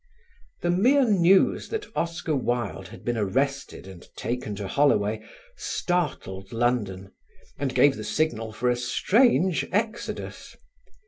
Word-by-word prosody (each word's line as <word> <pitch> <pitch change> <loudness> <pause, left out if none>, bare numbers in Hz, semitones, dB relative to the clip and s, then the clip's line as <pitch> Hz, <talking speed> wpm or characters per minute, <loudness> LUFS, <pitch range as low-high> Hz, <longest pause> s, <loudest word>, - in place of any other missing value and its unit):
The 175 - +2
mere 250 +9 +4
news 190 -2 +4
that 440 -2 -3
Oscar 165 -2 -1
Wilde 120 -2 -2
had - - -13
been 120 -1 -1
arrested 135 +5 -1
and 95 -2 -11
taken 115 -2 -3
to 100 -1 -5
Holloway 110 -4 +2 0.3
startled 135 - -2
London 110 -6 -1 0.5
and 135 -2 -2
gave 140 -1 +5
the 110 - -6
signal 115 -4 -1
for 115 +3 -2
a - - +1
strange 180 - +2
exodus. 220 +4 -3
135 Hz, 125 wpm, -25 LUFS, 110-175 Hz, 0.5 s, gave